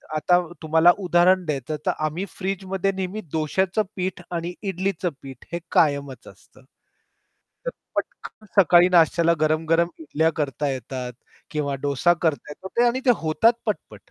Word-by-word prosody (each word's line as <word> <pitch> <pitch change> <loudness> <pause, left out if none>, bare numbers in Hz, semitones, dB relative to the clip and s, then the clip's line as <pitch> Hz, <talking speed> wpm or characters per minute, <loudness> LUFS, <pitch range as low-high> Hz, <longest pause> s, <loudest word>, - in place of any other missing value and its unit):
आता 175 +3 +3 0.2
तुम्हाला 160 +2 +5
उदाहरण 180 0 +3
द्यायचं 150 -1 -3
तर - - +3
आम्ही 160 +5 -3
फ्रिजमध्ये 195 0 -2
नेहमी 190 +3 -4
डोश्याचं 180 +6 0
पीठ 185 -1 -3
आणि 170 +1 -3
इडलीच 190 -2 -2 0.2
पीठ 135 -3 -11
हे 170 - -1
कायमच 140 -3 +1
असतं. - - -17 1.1
तर - - 0 0.3
पटकन 215 - -5
सकाळी 175 0 +6
नाश्त्याला 170 -1 +4
गरम-गरम 160 +2 +2
इडल्या 160 +1 0
करता 145 -1 -1
येतात 130 -1 -5 0.4
किंवा 145 -3 -2
डोसा 145 +4 +3
करता 155 -3 0
येतात 190 +9 -2
आणि 240 +2 +1
ते - - +7
होतात 160 +9 +4
पटपट - - -5
170 Hz, 135 wpm, -23 LUFS, 150-185 Hz, 1.1 s, ते